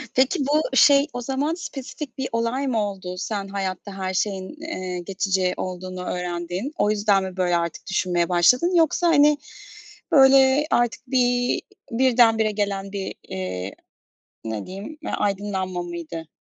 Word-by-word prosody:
peki, 265 +7 +3
bu, 285 -1 +1
şey, 280 +2 +6
o 245 - -4
zaman 275 +5 -1
spesifik 285 -4 -7
bir 265 -1 -2
olay 230 +4 -1
mı 235 -4 +1
oldu? 185 -2 -7
Sen 200 +1 -3
hayatta 195 0 -4
her 190 -1 -3
şeyin, 190 -1 -1
eee, 185 - -4
geçici 190 0 0
olduğunu 185 0 -5
öğrendin. 180 - -3
O 210 - +2
yüzden 205 -2 +2
mi 190 0 -6
böyle 175 -1 +2
artık 170 0 -4
düşünmeye 175 -3 0
başladın? 250 - +4
Yoksa, 335 +1 +3
hani, 295 -2 +5 0.7
böyle 270 0 +6
artık 240 -1 +1
bir 245 -1 +1 0.3
birdenbire 230 -3 +4
gelen 200 -1 -2
bir, 195 -1 -4
eee, 90 0 -5 0.7
ne 110 -2 -4
diyeyim, 200 +12 -8
e - - -3
aydınlanma 190 -3 -2
mıydı? 170 -2 -7
200 Hz, 145 wpm, -23 LUFS, 185-265 Hz, 0.7 s, şey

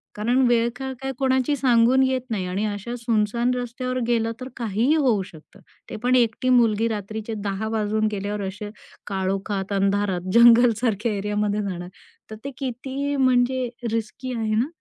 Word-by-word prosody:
कारण 240 +5 +1
वेळ-काळ 240 +3 0
काय 270 0 -2
कोणाची 260 +1 +1
सांगून 255 -1 +4
येत 260 -1 +1
नाही 205 -5 -2
आणि 190 +4 -1
अशा 210 +3 -4
सुनसान 230 +1 0
रस्त्यावर 250 +1 -3
गेलं 230 -1 +1
तर 255 - -5
काहीही 235 +5 +1
होऊ 255 -10 +2
शकतं. 170 -5 -15 0.3
ते - - -6
पण 250 +1 +3
एकटी 240 +1 +2
मुलगी 230 -3 +3
रात्रीचे 220 +1 -4
10:00 200 +1 -2
वाजून 215 0 0
गेल्यावर 205 0 -3
असे 205 +2 -6 0.4
काळोखात 195 +1 -2
अंधारात 195 -2 0
जंगलसारख्या 235 -2 +5
एरियामध्ये 210 +1 -1
जाणार 180 -3 -5 0.4
तर 215 - -7
ते 280 - -4
किती 270 +2 -3
म्हणजे 255 -1 +2 0.2
रिस्की 230 +3 -3
आहे 220 -1 -1
ना. 235 +5 +1
230 Hz, 150 wpm, -23 LUFS, 205-250 Hz, 0.4 s, जंगलसारख्या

